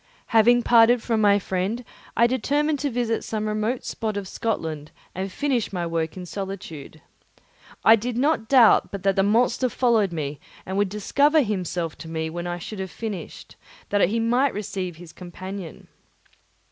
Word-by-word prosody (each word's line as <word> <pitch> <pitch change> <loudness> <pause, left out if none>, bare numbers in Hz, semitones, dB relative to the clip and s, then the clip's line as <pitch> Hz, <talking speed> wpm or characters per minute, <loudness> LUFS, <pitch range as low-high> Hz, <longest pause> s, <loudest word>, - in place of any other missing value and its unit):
Having 240 +2 +5
parted 235 0 +5
from 225 -2 0
my 205 -1 +5
friend, 195 +5 -2 0.3
I 235 - +6
determined 285 +5 0
to 285 - -1
visit 235 -2 -1
some 215 -1 -3
remote 215 +4 -2
spot 215 -2 -3
of 200 -2 -4
Scotland 160 -9 -3 0.2
and 190 +1 -4
finish 260 -3 -1
my 180 -3 -2
work 165 0 -2
in 180 - -6
solitude. 180 -6 -7 0.8
I 225 - +9
did 235 +2 -4
not 275 -4 +1
doubt 250 -5 +5
but 200 -2 -6
that 195 -1 +2
the 195 - +3
monster 235 +5 +2
followed 230 -5 +2
me 150 -3 -4 0.3
and 190 - -4
would 200 -1 +1
discover 280 +9 +2
himself 180 -6 -3
to 165 - -8
me 160 0 -3
when 175 +1 -5
I 175 0 -3
should 195 +4 -7
have 190 0 -4
finished, 215 -1 -7 0.3
that 200 -3 +3
he 230 +3 0
might 245 +3 +2
receive 190 -4 -4
his 170 0 -13
companion. 185 0 -8
205 Hz, 170 wpm, -24 LUFS, 180-235 Hz, 0.8 s, I